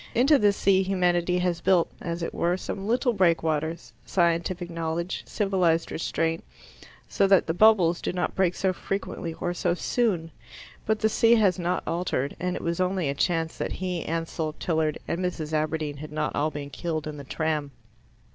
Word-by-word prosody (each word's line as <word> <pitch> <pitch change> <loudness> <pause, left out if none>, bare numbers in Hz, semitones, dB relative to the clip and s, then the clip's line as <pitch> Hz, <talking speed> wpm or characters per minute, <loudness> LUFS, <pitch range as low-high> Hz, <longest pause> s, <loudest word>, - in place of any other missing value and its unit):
Into 275 +4 +5
this 205 -2 +3
sea 190 -1 +4
humanity 180 -2 +1
has 180 -1 0
built, 185 -3 +3
as 170 0 -3
it - - -3
were, 175 +2 +1
some 195 +1 -5
little 245 +2 +2
breakwaters 160 - 0
scientific 170 +3 0
knowledge, 165 +2 -3
civilized 185 -5 +1
restraint 165 0 -1 0.6
so 195 - +2
that 195 -1 +5
the 165 - -1
bubbles 180 -3 +4
do - - -1
not 180 0 -2
break 185 -2 +1
so 190 -1 +1
frequently 180 -3 -4
or 175 +1 -2
so 175 0 0
soon. 180 -6 0 0.6
But 220 0 +2
the 220 - +4
sea 230 +1 +4
has 200 -5 +3
not 175 +1 -1
altered, 165 -5 -1
and 180 0 -1
it - - -5
was 170 +2 -1
only 185 -4 0
a - - 0
chance 165 +2 0
that - - -2
he, 180 -2 -3
Ansell, 165 -1 -3
Tilliard, 160 -2 -1
and 170 - -2
Mrs. 160 -4 -3
Aberdeen 155 -1 -1
had 155 +1 -8
not 150 0 -2
all 150 +2 +1
been 145 -1 -7
killed 155 +2 -3
in 150 -1 -6
the 140 - -8
tram. 155 0 -2
170 Hz, 180 wpm, -26 LUFS, 160-185 Hz, 0.6 s, Into